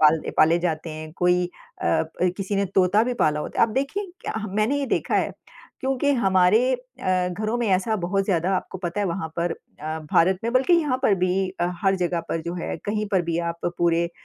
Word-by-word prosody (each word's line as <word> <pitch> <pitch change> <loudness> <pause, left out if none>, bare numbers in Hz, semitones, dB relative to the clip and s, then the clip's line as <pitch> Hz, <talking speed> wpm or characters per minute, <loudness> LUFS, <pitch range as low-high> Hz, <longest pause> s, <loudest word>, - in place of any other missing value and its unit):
पाल 155 +1 +6
दे - - -5
पाले 160 +2 +5
जाते 165 -2 -2
हैं। 155 0 -7
कोई 180 0 +3 0.4
अ - - 0
अ, 160 0 +2 0.3
किसी 195 0 -2
ने 200 - +2
तोता 190 +3 +4
भी 250 - -1
पाला 150 -8 +1
होता - - -6
है। 230 - +7
आप 220 - -7
देखें, 280 +10 -1 0.2
क्या - - -4
हम 210 -3 -4
मैंने 220 +7 +2
ये 280 - -1
देखा - - 0
है - - 0 0.5
क्योंकि 270 +2 +1
हमारे 190 -2 +4
अ, 185 -8 -2
घरों 215 +6 -2
में 235 - 0
ऐसा 190 +4 +2
बहुत 195 +3 0
ज़्यादा 180 -2 +1
आपको 190 - -5
पता 180 +2 -3
है 200 - +1
वहाँ 170 -2 -3
पर 170 0 0
अ, 155 0 -7
भारत 185 +2 +4
में 230 - -1
बल्कि 260 +7 +3
यहाँ 295 -6 +1
पर 215 - +4
भी 185 +1 +1
अ, - - +3 0.2
हर 195 -1 +3
जगह 175 -1 0
पर 165 - -1
जो 170 +1 -4
है, 175 - -4
कहीं 210 +1 -1
पर 185 -2 +3
भी 170 0 -2
आप 170 0 -3
पूरे 170 0 +3
अ, - - -11
185 Hz, 230 wpm, -24 LUFS, 170-215 Hz, 0.5 s, है